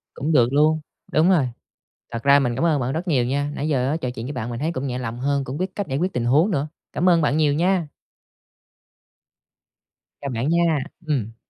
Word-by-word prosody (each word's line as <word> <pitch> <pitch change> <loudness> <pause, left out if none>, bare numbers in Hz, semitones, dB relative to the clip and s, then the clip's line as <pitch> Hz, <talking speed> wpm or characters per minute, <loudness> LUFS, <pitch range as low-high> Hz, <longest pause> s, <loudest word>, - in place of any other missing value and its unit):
Cũng 155 +4 -2
được 125 -3 +4
luôn, 155 +2 +4 0.3
đúng 160 +4 +4
rồi. 150 -9 +3 0.6
Thật 115 - -4
ra 140 0 +6
mình 125 -4 0
cảm 165 - -1
ơn 155 -5 +2
bạn 125 +2 -1
rất 170 +4 -3
nhiều 130 -6 +2
nha. 145 +3 -1
Nãy 150 - -2
giờ 130 -4 +1
á, 155 - 0
trò 130 -6 -3
chuyện 120 -1 -6
với 145 - -4
bạn 120 -3 -4
mình 120 +1 -5
thấy 160 +3 -1
cũng 140 -2 -3
nhẹ 125 -1 -3
lòng 120 -1 -5
hơn, 140 0 0
cũng 130 +4 -5
biết 185 0 -3
cách 200 -4 -4
giải 135 0 -1
quyết 185 +3 -1
tình 120 -1 -1
huống 150 - +3
nữa. 150 -5 -1 0.2
Cảm 180 +3 +1
ơn 170 -2 +4
bạn 145 0 +2
nhiều 150 -2 +3
nha. 175 0 +1 2.3
Chào 140 - -3
bạn 120 +6 -1
nha, 170 -3 +2 0.3
ừm. 115 -7 -1
145 Hz, 230 wpm, -22 LUFS, 125-160 Hz, 2.3 s, ra